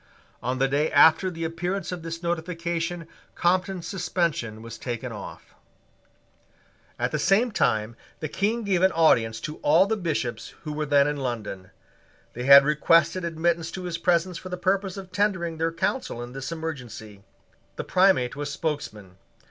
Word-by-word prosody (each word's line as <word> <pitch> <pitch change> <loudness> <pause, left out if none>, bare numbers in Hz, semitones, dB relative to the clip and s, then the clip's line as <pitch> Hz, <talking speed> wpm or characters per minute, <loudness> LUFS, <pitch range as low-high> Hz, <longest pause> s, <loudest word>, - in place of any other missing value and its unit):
On 125 +1 -2
the 135 +1 +2
day 145 +3 0
after 160 +5 +6
the 165 -2 -6
appearance 175 +3 -3
of 180 -2 -5
this 165 +1 -6
notification 170 0 -3 0.3
Compton's 180 0 0
suspension 170 - -2
was 115 -1 -9
taken 120 0 -4
off. 105 -3 -10 1.4
At - - -1
the - - -1
same 225 +5 +3
time 110 - 0 0.2
the 155 - -3
King 215 +8 -1
gave 190 -4 +1
an 190 0 +5
audience 115 -9 +3
to 155 +5 -6
all 165 +6 +4
the 220 +2 0
Bishops 145 - -3
who 150 -2 -5
were 150 0 -3
then 140 -1 +4
in 145 0 -1
London. 110 -8 -5 0.6
They 125 +1 -5
had 140 0 +9
requested 165 +4 +3
admittance 165 0 0
to 185 - -5
his 170 -2 -4
presence 175 0 +1
for 185 - -9
the 180 - -4
purpose 195 +1 0
of 190 -2 -9
tendering 185 -5 -1
their 165 0 +1
counsel 165 - -2
in 120 - -9
this 135 +3 -5
emergency. 125 -11 -7 0.5
The - - -4
Primate 185 -11 +3
was 145 0 -4
spokesman. 105 - -5
165 Hz, 165 wpm, -25 LUFS, 135-180 Hz, 1.4 s, had